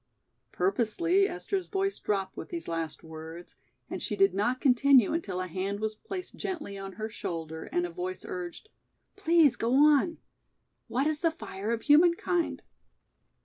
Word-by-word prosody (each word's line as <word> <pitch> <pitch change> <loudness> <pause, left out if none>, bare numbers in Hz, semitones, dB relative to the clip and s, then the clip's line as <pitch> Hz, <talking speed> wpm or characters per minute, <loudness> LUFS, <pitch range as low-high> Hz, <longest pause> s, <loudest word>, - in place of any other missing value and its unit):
Purposely 350 - +2
Esther's 385 -3 -3
voice 390 0 -1
dropped 195 -2 -1
with - - -7
these 340 -2 -5
last 165 -2 -4
words, 160 +2 -10 0.3
and - - -5
she - - -2
did 390 0 +4
not 240 +6 0
continue 265 -2 +5
until 200 - -2
a 185 - -2
hand 190 +3 -3
was 220 0 -1
placed 375 - -7
gently 315 - -4
on 195 0 -7
her 215 +3 -4
shoulder 165 -7 -5
and 175 0 +1
a 175 - -5
voice 180 +2 -5
urged: 180 - -6 0.5
"Please 335 - +4
go 235 +3 0
on; 300 +3 +5 0.7
what 260 +4 0
is 305 -1 0
the 330 - +4
'fire 215 -10 -6
of 230 -1 -1
humankind'?" 340 +3 +3
235 Hz, 155 wpm, -29 LUFS, -, 0.7 s, continue